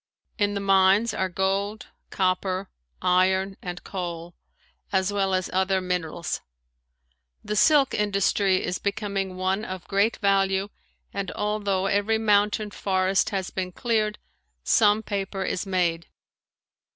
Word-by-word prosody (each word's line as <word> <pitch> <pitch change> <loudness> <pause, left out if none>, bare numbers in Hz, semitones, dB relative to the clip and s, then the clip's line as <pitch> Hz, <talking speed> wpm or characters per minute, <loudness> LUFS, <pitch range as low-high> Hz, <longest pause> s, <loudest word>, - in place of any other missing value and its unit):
In 205 0 +1
the - - -1
mines 195 +3 +4
are 190 - -1
gold, 195 +3 -1 0.2
copper, 185 0 -1 0.3
iron 190 +1 +2
and 180 -1 -6
coal, 175 -2 -5 0.6
as 190 +1 +1
well 195 -2 +1
as 185 -1 -1
other 190 +1 +2
minerals. 175 -2 -3 1.0
The 210 - -2
silk 285 +4 +4
industry 200 -2 +1
is 180 - -2
becoming 200 -2 -2
one 190 +3 0
of 185 -3 -7
great 200 +3 +1
value 195 0 +1 0.4
and 200 -2 -3
although 205 -2 -1
every 205 +3 +1
mountain 210 0 +2
forest 190 -1 +1
has 190 -2 -3
been 185 -1 -3
cleared, 215 -2 0 0.5
some 215 -1 +4
paper 195 -1 -3
is 185 - -2
made. 170 -3 0
195 Hz, 125 wpm, -25 LUFS, 185-205 Hz, 1.0 s, mines